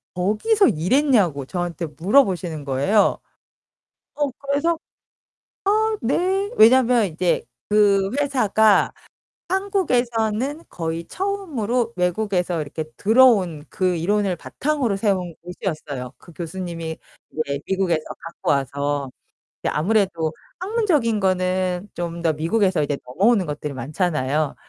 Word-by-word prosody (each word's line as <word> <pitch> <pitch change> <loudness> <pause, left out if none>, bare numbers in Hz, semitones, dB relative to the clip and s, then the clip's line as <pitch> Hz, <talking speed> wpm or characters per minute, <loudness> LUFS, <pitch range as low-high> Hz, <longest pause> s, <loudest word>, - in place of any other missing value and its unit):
거기서 270 - +2
일했냐고 180 - +2
저한테 175 0 -3
물어보시는 175 - +1
거예요. 140 +11 +2 1.0
어 290 -2 0
그래서 285 +4 +1 1.1
"어, 440 -1 0
네." 375 - 0
왜냐면 240 -1 +6
이제 175 0 0 0.3
그 200 -2 +4
회사가 220 -7 +3 0.6
한국에서는 265 - 0
거의 165 0 -4
처음으로 255 - -2
외국에서 180 -2 0
이렇게 155 +2 -5
들어온 205 - +4
그 185 -3 0
이론을 195 +2 0
바탕으로 275 - -1
세운 185 -5 -1
곳이었어요. 155 -7 -5
그 175 - -16
교수님이 165 -1 -5 0.3
이제 140 -3 -2
미국에서 185 -5 0 0.2
갖고 165 - -3
와서. 140 0 -1 0.5
예 - - +2
아무래도 175 -2 +1 0.3
학문적인 360 - +1
거는 185 0 0
좀 170 -1 -4
더 165 -1 +2
미국에서 180 +3 +1
이제 145 -1 -1
넘어오는 195 - +2
것들이 150 -1 -5
많잖아요. 150 +1 -1
190 Hz, 275 characters per minute, -22 LUFS, 165-240 Hz, 1.1 s, 왜냐면